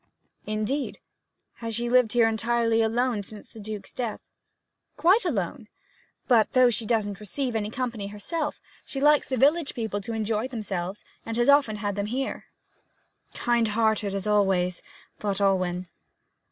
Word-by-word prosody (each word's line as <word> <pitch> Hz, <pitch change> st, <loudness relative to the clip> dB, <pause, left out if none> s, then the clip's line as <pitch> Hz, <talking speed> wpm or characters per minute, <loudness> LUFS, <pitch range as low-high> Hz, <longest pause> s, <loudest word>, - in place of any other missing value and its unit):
'Indeed. 215 Hz, +7 st, -2 dB, 0.6 s
Has 230 Hz, -1 st, -4 dB
she 240 Hz, +1 st, -1 dB
lived 245 Hz, -2 st, +4 dB
here 235 Hz, -2 st, +5 dB
entirely 230 Hz, 0 st, +1 dB
alone 230 Hz, 0 st, +1 dB
since 205 Hz, +1 st, -10 dB
the 225 Hz, -, -13 dB
Duke's 210 Hz, -1 st, -7 dB
death?' 235 Hz, -4 st, -3 dB, 0.8 s
'Quite 385 Hz, +7 st, +4 dB
alone. 225 Hz, -, -2 dB, 0.6 s
But 230 Hz, -4 st, +4 dB
though 255 Hz, -1 st, +6 dB
she 225 Hz, -1 st, 0 dB
doesn't 205 Hz, -4 st, 0 dB
receive 245 Hz, +5 st, -2 dB, 0.2 s
company 235 Hz, -5 st, -3 dB
herself, 210 Hz, -, -3 dB, 0.2 s
she 270 Hz, -, -6 dB
likes 295 Hz, +1 st, +4 dB
the 260 Hz, -, 0 dB
village 290 Hz, +4 st, +3 dB
people 220 Hz, -3 st, -2 dB
to 230 Hz, +4 st, -4 dB
enjoy 220 Hz, +1 st, -1 dB
themselves, 205 Hz, -5 st, -4 dB, 0.2 s
and 230 Hz, 0 st, -4 dB
often 280 Hz, -6 st, +5 dB
has 205 Hz, -1 st, -2 dB
'em 200 Hz, -, -1 dB
here.' 265 Hz, +4 st, -3 dB, 0.9 s
'Kind 235 Hz, -1 st, +2 dB
hearted, 220 Hz, -3 st, +1 dB
as 195 Hz, 0 st, -3 dB
always!' 190 Hz, -4 st, +2 dB, 0.4 s
thought 200 Hz, -1 st, -1 dB
Alwyn. 185 Hz, -2 st, +1 dB
225 Hz, 140 wpm, -26 LUFS, 205-250 Hz, 0.9 s, though